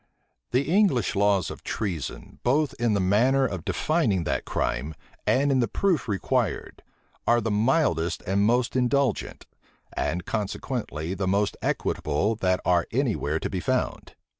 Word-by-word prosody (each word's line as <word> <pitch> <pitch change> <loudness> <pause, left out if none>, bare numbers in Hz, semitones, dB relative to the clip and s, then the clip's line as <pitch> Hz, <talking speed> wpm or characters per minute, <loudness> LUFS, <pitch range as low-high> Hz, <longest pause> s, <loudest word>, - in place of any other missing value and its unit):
The 125 +3 +2
English 165 - +2
laws 100 -1 +2
of - - -10
treason, 90 -9 -4
both 140 +3 +1
in 115 -3 +2
the - - +1
manner 120 +9 +3
of 95 -9 -3
defining 100 - +1
that 70 -4 -2
crime, 70 +5 -2 0.3
and 140 +2 +3
in 135 - +3
the 120 - +2
proof 175 - 0
required, 110 +1 -1 0.5
are 120 0 +5
the 115 -1 -2
mildest 105 - +1
and 95 +1 +1
most 120 +4 +2
indulgent, 130 -1 0 0.5
and 85 +3 -2
consequently 105 - -3
the 95 0 -2
most 100 +2 +1
equitable, 75 +9 0
that 90 -3 +1
are 90 -1 +2
any 125 -2 +1
where 75 +2 -1
to - - -2
be 95 - -2
found. - - -2
105 Hz, 150 wpm, -26 LUFS, 90-130 Hz, 0.5 s, are